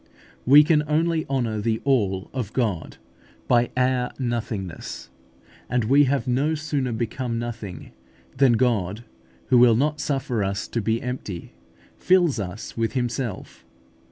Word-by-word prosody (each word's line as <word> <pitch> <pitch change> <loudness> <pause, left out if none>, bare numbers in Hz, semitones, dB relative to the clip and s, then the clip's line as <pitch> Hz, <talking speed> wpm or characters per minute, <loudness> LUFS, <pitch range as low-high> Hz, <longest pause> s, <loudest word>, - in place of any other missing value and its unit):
We 145 +3 +9
can 155 -1 +3
only 160 +1 +1
honour 120 -6 -1
the 110 0 0
ALL 100 -9 0
of 125 -6 -4
God 105 -10 -2 0.5
by 120 -1 +3
our 125 -1 +1
NOTHINGNESS; 115 - -4 0.6
and 125 -1 +1
we 140 +6 +5
have 135 0 0
no 140 +6 +1
sooner 145 -5 -2
become 115 +1 -3
nothing, 115 -5 -6 0.4
than 130 -2 +4
God, 110 -4 0 0.5
who 125 - +6
will 120 -2 +6
not 150 +4 0
suffer 130 -6 -1
us 100 +1 -2
to 115 - -2
be 115 +4 -1
empty, 125 -8 -6 0.5
fills 175 -8 +3
us 100 +3 -6
with 115 -1 -1
Himself. 120 -4 -3
120 Hz, 135 wpm, -24 LUFS, 110-135 Hz, 0.6 s, We